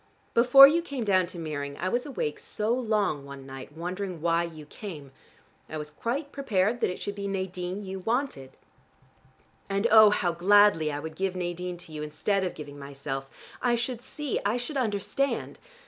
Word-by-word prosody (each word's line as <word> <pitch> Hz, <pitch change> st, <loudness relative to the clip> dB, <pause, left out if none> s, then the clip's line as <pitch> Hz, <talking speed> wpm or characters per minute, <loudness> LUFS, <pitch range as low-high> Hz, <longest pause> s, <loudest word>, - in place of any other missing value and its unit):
Before 255 Hz, +3 st, +9 dB
you 325 Hz, +4 st, +2 dB
came 280 Hz, -7 st, -4 dB
down 185 Hz, -4 st, +3 dB
to 175 Hz, -, -9 dB
Meering 145 Hz, -3 st, -4 dB
I 185 Hz, -, -2 dB
was 240 Hz, +8 st, -1 dB
awake 150 Hz, -, -3 dB
so 215 Hz, +2 st, -1 dB
long 215 Hz, -, 0 dB
one 140 Hz, -1 st, -10 dB
night, 135 Hz, +1 st, -9 dB
wondering 180 Hz, +1 st, -4 dB
why 165 Hz, +1 st, +2 dB
you 160 Hz, -3 st, -9 dB
came. 150 Hz, -5 st, -9 dB, 0.6 s
I 155 Hz, -, -5 dB
was 150 Hz, 0 st, -6 dB
quite 265 Hz, -, -3 dB
prepared 230 Hz, -4 st, 0 dB
that -, -, +2 dB
it 180 Hz, -, -5 dB
should 205 Hz, -, -4 dB
be 200 Hz, 0 st, -4 dB
Nadine 190 Hz, 0 st, -3 dB
you 190 Hz, 0 st, -5 dB
wanted. 225 Hz, -, -2 dB, 1.1 s
And, 195 Hz, +2 st, 0 dB
oh, 215 Hz, -1 st, +9 dB
how 185 Hz, -4 st, +1 dB
gladly 180 Hz, -2 st, +5 dB
I 145 Hz, -, -3 dB
would 160 Hz, +1 st, -7 dB
give 190 Hz, +1 st, -1 dB
Nadine 180 Hz, 0 st, -3 dB
to 170 Hz, -2 st, -12 dB
you, 155 Hz, -1 st, -6 dB
instead 170 Hz, +6 st, -1 dB
of 185 Hz, -, -3 dB
giving 145 Hz, -1 st, -9 dB
myself: 140 Hz, -1 st, -5 dB, 0.3 s
I 245 Hz, -1 st, +3 dB
should 235 Hz, 0 st, -3 dB
see: 295 Hz, +1 st, -3 dB
I 205 Hz, +4 st, +1 dB
should 245 Hz, +5 st, -5 dB
understand. 255 Hz, +3 st, -1 dB
185 Hz, 180 wpm, -27 LUFS, 155-225 Hz, 1.1 s, Before